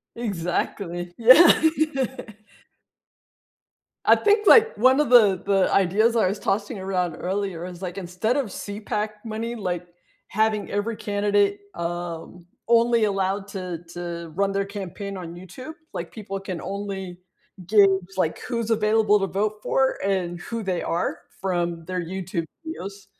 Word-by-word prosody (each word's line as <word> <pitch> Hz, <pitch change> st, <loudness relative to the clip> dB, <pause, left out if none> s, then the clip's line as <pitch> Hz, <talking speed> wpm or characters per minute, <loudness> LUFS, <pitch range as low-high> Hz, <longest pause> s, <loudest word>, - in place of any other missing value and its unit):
Exactly. 175 Hz, -3 st, -3 dB
Yeah. 255 Hz, +9 st, +8 dB, 2.5 s
I -, -, +8 dB
think, 420 Hz, 0 st, +2 dB
like, 455 Hz, +1 st, +7 dB
one 260 Hz, +5 st, +5 dB
of 300 Hz, -4 st, +2 dB
the 210 Hz, -7 st, +6 dB
the 195 Hz, -2 st, +2 dB
ideas 210 Hz, +5 st, +3 dB
I 220 Hz, -, +3 dB
was 200 Hz, +3 st, -1 dB
tossing 205 Hz, +3 st, -1 dB
around 180 Hz, -3 st, -1 dB
earlier 190 Hz, -2 st, -3 dB
is, 180 Hz, 0 st, -9 dB
like, 180 Hz, 0 st, -5 dB
instead 195 Hz, +7 st, -1 dB
of 275 Hz, -, 0 dB
CPAC 210 Hz, +1 st, -4 dB, 0.2 s
money, 225 Hz, +2 st, -4 dB
like, 180 Hz, -5 st, -3 dB, 0.4 s
having 215 Hz, 0 st, 0 dB
every 210 Hz, +2 st, -1 dB
candidate, 205 Hz, 0 st, +1 dB
um, 170 Hz, 0 st, -5 dB, 0.2 s
only 235 Hz, -1 st, +4 dB
allowed 195 Hz, 0 st, -1 dB
to 185 Hz, -4 st, -5 dB
to 170 Hz, -2 st, -6 dB
run 195 Hz, +1 st, +1 dB
their 195 Hz, 0 st, 0 dB
campaign 200 Hz, 0 st, -6 dB
on 170 Hz, -2 st, -7 dB
YouTube 195 Hz, -, -9 dB, 0.2 s
like, -, -, -5 dB
people 195 Hz, -3 st, -6 dB
can 185 Hz, -3 st, -5 dB
only 195 Hz, -2 st, -5 dB, 0.5 s
gauge, 195 Hz, -2 st, +5 dB
like, 165 Hz, -4 st, 0 dB
who's 235 Hz, -3 st, -2 dB
available 215 Hz, -1 st, +3 dB
to 195 Hz, -, 0 dB
vote 205 Hz, +3 st, -1 dB
for 265 Hz, 0 st, +1 dB
and 180 Hz, -3 st, -1 dB
who 230 Hz, +3 st, -4 dB
they 185 Hz, -3 st, -1 dB
are 170 Hz, 0 st, -1 dB, 0.2 s
from 175 Hz, -3 st, -2 dB
their 185 Hz, 0 st, -3 dB
YouTube 175 Hz, -1 st, -4 dB, 0.2 s
videos. 200 Hz, -, -7 dB
195 Hz, 140 wpm, -24 LUFS, 180-215 Hz, 2.5 s, Yeah